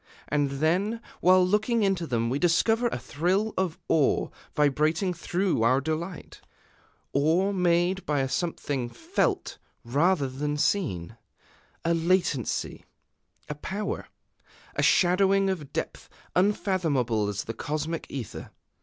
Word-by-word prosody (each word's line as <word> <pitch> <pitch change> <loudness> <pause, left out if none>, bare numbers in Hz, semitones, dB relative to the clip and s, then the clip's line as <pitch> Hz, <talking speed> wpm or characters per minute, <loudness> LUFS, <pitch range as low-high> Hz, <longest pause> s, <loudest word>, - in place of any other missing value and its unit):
And 145 -1 +1
then, 180 +10 +1 0.2
while 185 0 +5
looking 215 +4 +1
into 190 -4 0
them, 115 -2 0
we 135 - 0
discover 225 +8 +3
a - - -2
thrill 185 +8 0
of 185 -4 -1
awe 150 -4 +2 0.3
vibrating 155 +5 +2
through 175 - -1
our 130 +4 +4
delight, 160 +4 -5 0.7
awe 165 +8 +2
made 180 0 +1
by 145 -2 0
a 135 - 0
something 135 -3 -2
felt 330 - -1 0.2
rather 145 +5 +2
than 145 +3 -3
seen: 115 - -1 0.7
a 170 - +3
latency, 165 - 0 0.6
a - - -3
power, 195 +8 -4 0.7
a - - +1
shadowing 195 +2 +4
of 155 -7 -5
depth - - -5 0.3
unfathomable 160 - +1
as 100 -1 -3
the 115 - -5
cosmic 155 +5 -3
Ether. 130 -6 -6
165 Hz, 120 wpm, -27 LUFS, 140-190 Hz, 0.7 s, while